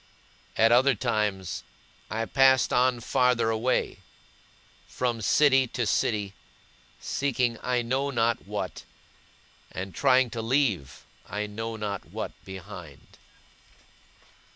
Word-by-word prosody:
At 115 +1 +5
other 130 +2 +5
times, 105 -5 -2 0.5
I 115 +1 -2
passed 130 -1 +4
on 125 -1 +2
farther 125 -2 +2
away, 115 +3 0 0.9
from 120 -3 -2
city 135 +3 +4
to 120 - +1
city, 105 -2 0 0.7
seeking 125 -4 -1
I 125 -1 0
know 130 +4 -1
not 115 -3 0
what, - - -5 0.9
and 95 +1 -6
trying 130 -3 +3
to 115 - -4
leave 115 - 0 0.3
I 105 +1 -2
know 115 +2 -5
not 105 -3 -4
what - - -5
behind. 95 -6 -11
115 Hz, 105 wpm, -27 LUFS, 105-130 Hz, 0.9 s, At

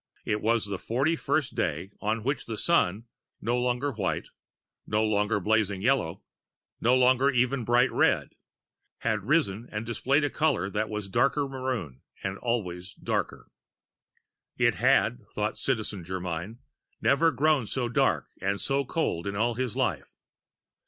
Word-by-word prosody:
It 105 0 0
was 115 0 +2
the 100 -2 -4
forty 135 +8 +1
first 155 -3 0
day 85 +7 -2
on 110 +1 -1
which 135 +1 -2
the 115 -2 -4
Sun 110 - +2 0.3
no 120 +2 0
longer 125 +3 0
white, 105 -6 -2 0.6
no 105 +1 +1
longer 105 0 +1
blazing 105 -1 +1
yellow, 115 -9 +1 0.6
no 120 +2 +4
longer 130 +2 +4
even 125 0 +1
bright 120 +3 +3
red - - +2 0.7
had 110 -3 0
risen 120 -6 +1
and 105 +1 -4
displayed 135 +5 +1
a 145 - +1
color 150 -11 +1
that 105 +1 -1
was 105 -2 -4
darker 135 +7 +2
maroon 125 - -4 0.2
and 95 0 -3
always 95 -6 -3
darker. - - -3 1.1
It - - +4
had, - - +2
thought - - -2
Citizen 100 -4 -2
Germyn, 90 +3 -4 0.4
never 165 +4 +4
grown 145 -3 +2
so 125 +1 -1
dark 120 - +1 0.2
and 100 +1 0
so 140 0 +1
cold 120 - -2
in 100 - -3
all 115 +4 +2
of 115 - -7
his 125 -4 -2
life. - - -1
115 Hz, 150 wpm, -28 LUFS, 100-130 Hz, 1.1 s, no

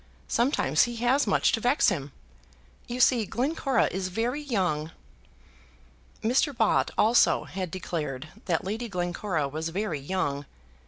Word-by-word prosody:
Sometimes 235 - +2
he 240 -1 -5
has 245 +3 +2
much 195 - +3
to 225 - 0
vex 250 +5 +3
him. 145 -7 -3 0.8
You 245 +1 -4
see, 245 -2 +4
Glencora 270 - +1
is 190 0 -2
very 235 +9 -2
young." 180 - -1 1.3
Mr. 255 +4 +1
Bott 225 -3 +3
also 225 +3 +4
had 185 -2 -5
declared 155 -5 -4 0.2
that 170 -5 0
Lady 225 +4 -3
Glencora 175 -3 -2
was 155 +4 -4
very 180 -3 -2
young. 145 -3 -2
195 Hz, 130 wpm, -27 LUFS, 160-240 Hz, 1.3 s, see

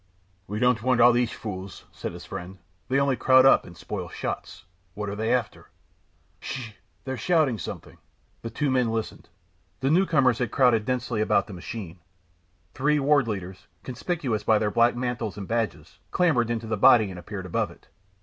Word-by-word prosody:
"We 105 - -4
don't 125 -1 +2
want 125 0 +2
all 120 +1 +8
these 120 -1 +2
fools," 95 -3 -7
said - - -6
his - - -10
friend. 90 +2 -7 0.3
"They 135 +2 +2
only 140 -1 +2
crowd 130 +1 +5
up 135 - +5
and 85 - -13
spoil - - -6
shots. - - -6 0.3
What 105 0 -4
are 100 - -4
they 110 +2 -1
after?" 125 -4 -2 0.7
"Ssh! 125 -5 -6 0.3
they're 130 0 -4
shouting 140 - +2
something." 80 - -8 0.4
The 115 - -5
two 140 +5 -1
men 125 -3 +2
listened. 110 -1 -4 0.5
The 135 +2 +1
new 185 +4 +4
comers 130 -7 +3
had 125 - 0
crowded 120 -5 +3
densely 120 -3 -1
about 110 - +2
the 105 - -10
machine. 90 -1 -7 0.7
Three 150 +3 +1
Ward 140 -2 +3
Leaders, 95 -3 -6 0.2
conspicuous 130 - -2
by 110 - +4
their 105 0 0
black 120 +4 +3
mantles 120 -4 -3
and 100 -2 -6
badges, 110 -10 -3
clambered 145 -10 +2
into 115 -1 -2
the 110 -1 -2
body 105 0 +6
and 90 - -8
appeared 95 +1 -7
above 90 - -1
it. - - -18
115 Hz, 180 wpm, -25 LUFS, 105-130 Hz, 0.7 s, all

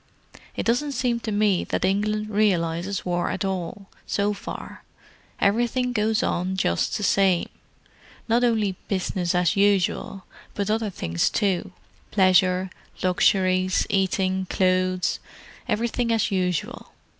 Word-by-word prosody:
It - - -3
doesn't 265 +5 +1
seem 245 -2 0
to 225 - -4
me 205 -3 +2
that - - -1
England 210 +2 0
realizes 190 -2 0
war 175 -1 0
at - - -2
all, 190 +1 -4 0.2
so 205 +1 0
far; 200 - -8 0.6
everything 240 +4 +1
goes 215 -1 +1
on 185 +2 -1
just 85 - 0
the 210 - -5
same—not 195 +4 -1
only 215 -5 +1
'business 185 -2 -1
as 180 -3 +2
usual,' 195 -1 +1 0.3
but 200 0 -1
other 220 -1 0
things 85 - -1
too: 195 -4 -1 0.4
pleasure, 185 -1 +3 0.3
luxuries, 185 0 +2
eating, 190 -1 0
clothes; 185 -1 +1 0.5
everything 235 +2 0
as 225 -3 +1
usual. 180 -3 -2
195 Hz, 120 wpm, -24 LUFS, 185-215 Hz, 0.6 s, pleasure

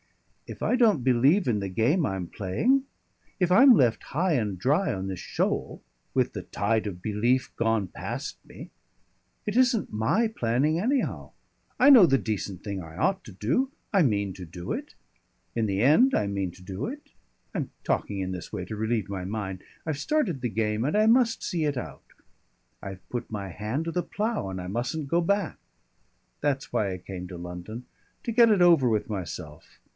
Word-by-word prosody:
"If - - -9
I - - +2
don't 220 - +3
believe 135 +9 +4
in 110 -4 +2
the 100 -1 -3
game 125 - +2
I'm 95 -2 -3
playing, 230 - +1 0.6
if 180 -1 +2
I'm 255 +7 +8
left 120 - +3
high 175 +4 0
and 105 -8 0
dry 150 - +2
on 95 0 -3
this 95 -2 -4
shoal, - - -2 0.3
with - - +2
the - - -4
tide 110 +1 -1
of 90 -3 -6
belief 115 +5 0
gone 115 -4 +1
past - - -5
me, - - -12 0.7
it 210 - -2
isn't 250 - +2
my 115 - +2
planning, 140 - +1
anyhow. 255 +7 -1 0.5
I - - +7
know 240 -9 +10
the 135 -2 +4
decent 105 -5 -4
thing 100 -3 -4
I 80 -1 -11
ought 190 - +1
to - - -10
do. 125 - 0 0.2
I 195 - +5
mean 100 - +1
to 95 - -9
do 85 +1 -6
it; - - -6 0.6
in 115 -2 +1
the 100 0 0
end 160 - +5
I - - +1
mean 100 -2 -2
to 90 - -16
do 95 +5 -4
it; 290 +4 -8 0.4
I'm - - -2 0.2
talking 100 -1 -1
in 95 -1 -2
this 90 -2 -6
way 95 -4 -4
to 110 - -6
relieve 110 -1 -1
my 95 -2 -4
mind. 95 -1 -4 0.2
I've 155 -3 -2
started 195 - 0
the 120 - -1
game 105 +1 -1
and 150 +9 +1
I 215 - +4
must 230 0 +3
see 170 -3 -1
it 145 -3 0
out; 80 - -6 0.8
I've 95 -1 -9
put 120 -1 -4
my 100 -3 -4
hand 110 - -3
to 165 - -2
the 180 +1 -1
plough 215 - -2
and 95 -1 -5
I 90 - -6
mustn't 120 +9 -3
go 170 +3 +3
back. 200 0 0 0.8
That's 140 -2 -1
why 100 -2 +1
I 90 - -4
came 90 0 -7
to 90 -1 -8
London 90 +7 -7 0.4
to 235 - -2
get 235 0 +6
it 205 -4 +4
over 165 -8 +5
with 110 -2 0
myself. 90 -7 -7
115 Hz, 190 wpm, -27 LUFS, -, 0.8 s, know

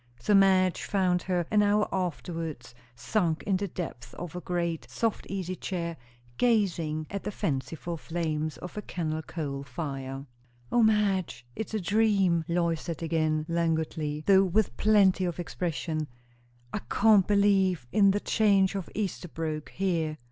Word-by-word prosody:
So 205 - +1
Madge 190 -2 +4
found 185 -3 +1
her 180 -2 -1
an 210 -1 +5
hour 210 +1 +3
afterwards, 165 -8 -4 0.2
sunk 170 - 0
in 195 - +1
the 200 +1 -2
depths 125 -10 -7
of 175 -1 -7
a 180 - -4
great, 170 -8 -2
soft 225 - -1
easy 185 -2 -3
chair, 170 -3 -4 0.4
gazing 175 -10 +1
at 200 -1 -3
the - - -4
fanciful 160 0 -3
flames 155 -2 -2
of 180 - -9
a 210 - -3
kennel 160 -5 -3
coal 145 -4 -4
fire. 135 0 -5 0.5
"O 240 - +4
Madge, 205 - +2
it's 220 0 -4
a - - +1
dream!" 195 -3 +2
Lois 170 -2 0
said 170 -1 -5
again 155 -1 0
languidly, 160 -2 -1
though 195 -1 +6
with 190 - +1
plenty 200 - +4
of 175 -1 -3
expression. 165 -3 -3 0.7
"I - - -1
can't 210 -3 +5
believe 195 -7 +3
in 200 -2 +5
the 200 +1 +2
change 200 -3 +3
from 195 -3 -4
Esterbrooke 165 -6 -3
here." 165 -5 -1
175 Hz, 150 wpm, -28 LUFS, 155-195 Hz, 0.7 s, though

